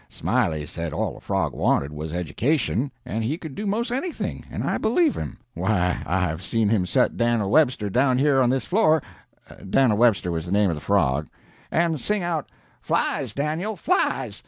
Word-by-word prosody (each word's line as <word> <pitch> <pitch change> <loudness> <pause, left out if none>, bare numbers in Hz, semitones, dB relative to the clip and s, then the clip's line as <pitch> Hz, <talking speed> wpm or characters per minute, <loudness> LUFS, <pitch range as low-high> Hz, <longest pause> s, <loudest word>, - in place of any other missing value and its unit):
Smiley 90 -12 0
said 85 0 -5
all - - -2
a - - -11
frog 95 -8 -1
wanted 70 +2 +1
was 75 +1 -5
education, 120 - 0
and 110 +2 -3
he 140 +8 -1
could 160 -5 -8
do 210 +8 -4
'most 230 +4 -1
anything 290 +8 -3
and - - -4
I - - -1
believe 290 +8 +2
him. - - -5 0.2
Why, 90 -7 0
I've 90 -2 0
seen 110 +2 0
him 100 -5 +1
set 90 - +1
Dan'l 115 -4 +1
Webster 125 -9 +3
down 125 +5 +2
here 135 0 +3
on 125 - +3
this 130 +1 0
floor 160 -7 +3 0.7
Dan'l 120 +1 +4
Webster 110 -6 +3
was 80 0 -3
the - - -5
name 100 -2 +3
of - - -2
the 75 - -8
frog 75 -7 +1 0.4
and 165 -4 +1
sing 210 -3 0
out, 165 -4 -2 0.3
'Flies, - - 0
Dan'l, 160 +9 -2
flies!' 370 - 0
120 Hz, 180 wpm, -24 LUFS, -, 0.7 s, Dan'l